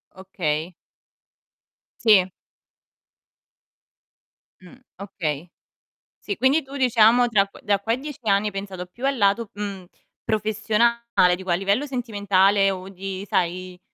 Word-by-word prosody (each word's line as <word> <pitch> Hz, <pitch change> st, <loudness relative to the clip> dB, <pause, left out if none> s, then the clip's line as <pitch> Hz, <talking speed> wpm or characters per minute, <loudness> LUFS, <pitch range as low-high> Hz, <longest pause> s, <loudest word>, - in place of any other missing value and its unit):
Okay. 175 Hz, -3 st, -3 dB, 1.3 s
Sì. 195 Hz, -5 st, +5 dB, 2.3 s
Mh. 180 Hz, +4 st, -15 dB, 0.2 s
Okay. 175 Hz, -5 st, -5 dB, 0.7 s
Sì, 405 Hz, -, -4 dB
quindi 275 Hz, +4 st, +3 dB
tu 270 Hz, +1 st, -11 dB
diciamo 245 Hz, -1 st, +4 dB
tra 200 Hz, -3 st, +3 dB
q 195 Hz, -, -17 dB
da 200 Hz, -1 st, +1 dB
qua 225 Hz, +3 st, -1 dB
a -, -, +2 dB
10 290 Hz, +1 st, -8 dB
anni 200 Hz, 0 st, +2 dB
hai -, -, -3 dB
pensato 195 Hz, -2 st, -6 dB
più 240 Hz, +9 st, -8 dB
al 275 Hz, -1 st, 0 dB
lato, 205 Hz, +1 st, +2 dB
mhmm, 200 Hz, -3 st, -6 dB, 0.4 s
professionale; 220 Hz, -2 st, +1 dB
dico 190 Hz, 0 st, -9 dB
a -, -, +3 dB
livello 200 Hz, +9 st, 0 dB
sentimentale 205 Hz, -6 st, +2 dB
o 190 Hz, 0 st, -7 dB
di 195 Hz, 0 st, -6 dB
sai 180 Hz, 0 st, -2 dB
200 Hz, 125 wpm, -23 LUFS, 185-230 Hz, 2.3 s, Sì